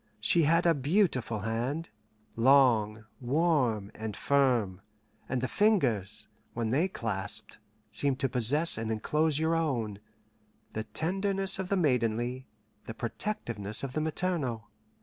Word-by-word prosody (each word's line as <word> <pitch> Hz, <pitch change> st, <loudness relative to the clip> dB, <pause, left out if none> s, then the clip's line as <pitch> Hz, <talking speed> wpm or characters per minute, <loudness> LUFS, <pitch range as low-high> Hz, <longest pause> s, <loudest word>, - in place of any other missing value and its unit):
She 140 Hz, +11 st, +4 dB
had 165 Hz, +3 st, +3 dB
a 170 Hz, -, +5 dB
beautiful 140 Hz, -, 0 dB
hand, 120 Hz, -, -3 dB, 0.4 s
long, 115 Hz, -4 st, +4 dB
warm, 130 Hz, -, +1 dB
and 110 Hz, -2 st, -6 dB
firm, 120 Hz, -9 st, +1 dB, 0.5 s
and 130 Hz, -, -1 dB
the 130 Hz, -, 0 dB
fingers, 130 Hz, -, +1 dB, 0.3 s
when 115 Hz, -1 st, -1 dB
they 155 Hz, +9 st, +2 dB
clasped, 105 Hz, -, -4 dB, 0.3 s
seemed 135 Hz, +5 st, 0 dB
to 135 Hz, -, +2 dB
possess 130 Hz, +5 st, +3 dB
and 115 Hz, 0 st, -3 dB
inclose 150 Hz, +7 st, +1 dB
your 160 Hz, +1 st, +1 dB
own 120 Hz, -11 st, -1 dB, 0.7 s
the 110 Hz, 0 st, -3 dB
tenderness 195 Hz, +3 st, -1 dB
of 190 Hz, -1 st, -3 dB
the 200 Hz, -, +1 dB
maidenly, 125 Hz, -4 st, 0 dB, 0.4 s
the 115 Hz, -, -6 dB
protectiveness 115 Hz, -, -4 dB
of 135 Hz, -2 st, -4 dB
the 155 Hz, -, -1 dB
maternal. 150 Hz, -9 st, -2 dB
130 Hz, 130 wpm, -29 LUFS, 110-160 Hz, 0.7 s, a